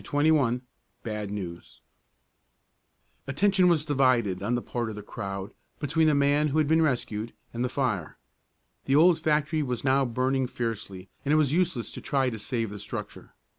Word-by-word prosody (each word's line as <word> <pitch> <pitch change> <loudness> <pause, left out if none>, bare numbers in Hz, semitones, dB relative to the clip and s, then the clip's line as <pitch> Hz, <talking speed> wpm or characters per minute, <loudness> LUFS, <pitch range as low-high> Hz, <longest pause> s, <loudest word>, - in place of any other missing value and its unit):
CHAPTER 145 +2 +3
XXI 125 -5 +2 0.4
BAD 105 -3 -4
NEWS 90 -4 -7 1.5
Attention 185 +6 +3
was 155 -3 +2
divided, 130 - +2
on 115 +5 0
the 120 - -1
part 120 -2 -3
of 110 - -6
the 105 - -8
crowd, 100 -1 -6 0.3
between 155 +2 +1
the 150 - +4
man 145 +2 +3
who 150 +1 -1
had 155 -2 +3
been 160 +2 +4
rescued, 115 -6 -1 0.2
and 120 +1 -2
the 125 - 0
fire. 115 - -2 0.7
The 135 - +2
old 165 +2 +6
factory 155 0 +1
was 125 -5 -3
now 135 0 +3
burning 130 +2 0
fiercely 105 -6 -5 0.2
and 145 - 0
it - - +5
was 150 -2 +2
useless 170 -9 0
to - - -7
try 135 -3 +1
to 110 - -6
save 115 0 -2
the 105 - -7
structure. - - -7
130 Hz, 175 wpm, -27 LUFS, 110-150 Hz, 1.5 s, old